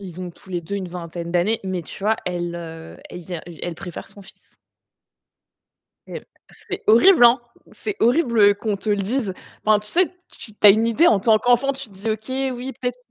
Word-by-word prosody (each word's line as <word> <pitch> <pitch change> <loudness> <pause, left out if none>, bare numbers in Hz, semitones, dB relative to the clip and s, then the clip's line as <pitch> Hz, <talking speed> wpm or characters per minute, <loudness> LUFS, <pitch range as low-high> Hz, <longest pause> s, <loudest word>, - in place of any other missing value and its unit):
Ils 185 -3 -9
ont 180 -1 -5
tous 190 +3 -18
les 175 -2 -2
2 170 +5 -6
une 190 -2 -4
vingtaine 170 -1 -7
d'années, 180 +6 +1
mais 185 -2 -3
tu 165 - -11
vois, 220 +2 +2
elle, 175 -1 -3
heu, 165 -1 -9
elle 180 - -9
ien 175 -1 -6
e 175 -2 -10
elle 175 - -3
préfère 175 0 -8
son 205 - -12
fils. - - -20 1.5
Mais, - - -8 0.4
c'est - - -4
horrible, 245 - +6
hein! 240 +1 +6 0.3
C'est 420 -2 -5
horrible 235 -6 +4
qu'on 210 0 -2
te 205 - -7
le 205 - +2
dise. 205 0 -2 0.3
Enfin, 215 -1 +4
tu 210 - -10
sais, 355 - +2 0.3
tu 215 - -12
tu 210 - +4
as - - +12
une 220 +3 +3
idée 230 +9 +3
en 210 -9 +4
tant 220 +1 +4
qu'enfant, 245 +4 +2
tu 270 -4 -8
te 200 - -19
dis: 205 +4 -3
«OK, 260 +5 -3
oui, 255 +2 -6
peut-être» 250 -1 -3
210 Hz, 215 wpm, -21 LUFS, 180-235 Hz, 1.5 s, as